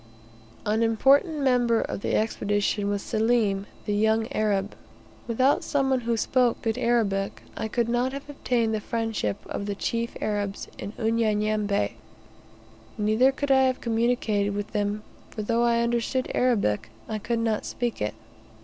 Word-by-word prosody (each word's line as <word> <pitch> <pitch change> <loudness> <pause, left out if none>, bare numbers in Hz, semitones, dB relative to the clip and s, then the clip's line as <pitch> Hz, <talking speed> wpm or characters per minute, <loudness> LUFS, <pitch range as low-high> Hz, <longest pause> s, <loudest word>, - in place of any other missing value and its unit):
An 215 +2 +1
important 275 +7 +3
member 245 -3 +3
of - - -4
the - - 0
Expedition 205 -1 0
was 205 -1 -1
Selim, 215 -3 +1 0.2
the 205 - -1
young 220 +2 +2
Arab. 205 -2 0 0.5
Without 255 +4 +2
some 275 -2 +1
one 260 - +3
who 235 -1 -1
spoke 245 +1 +2
good 225 -1 0
Arabic, 200 -5 0
I - - -3
could 235 +1 0
not 245 +2 +1
have 275 +1 -7
obtained 245 -5 0
the 215 - 0
friendship 225 - -2
of 200 - -4
the 200 - -2
chief 230 +3 -2
Arabs 205 -2 -2
in 205 - -6
Unyanyembe; 215 -2 +1 1.1
neither 215 +5 +3
could 285 +1 -2
I 265 0 +6
have 260 0 +2
well - - -16
communicated 225 -3 +1
with 205 0 -4
them, 210 0 -1 0.3
for 215 - -5
though 230 +2 +1
I 235 0 +3
understood 240 +2 -1
Arabic, 205 - +1 0.2
I 215 - -3
could 235 +3 -1
not 225 -2 0
speak 240 - -3
it. 105 - -1
225 Hz, 160 wpm, -26 LUFS, 210-240 Hz, 1.1 s, I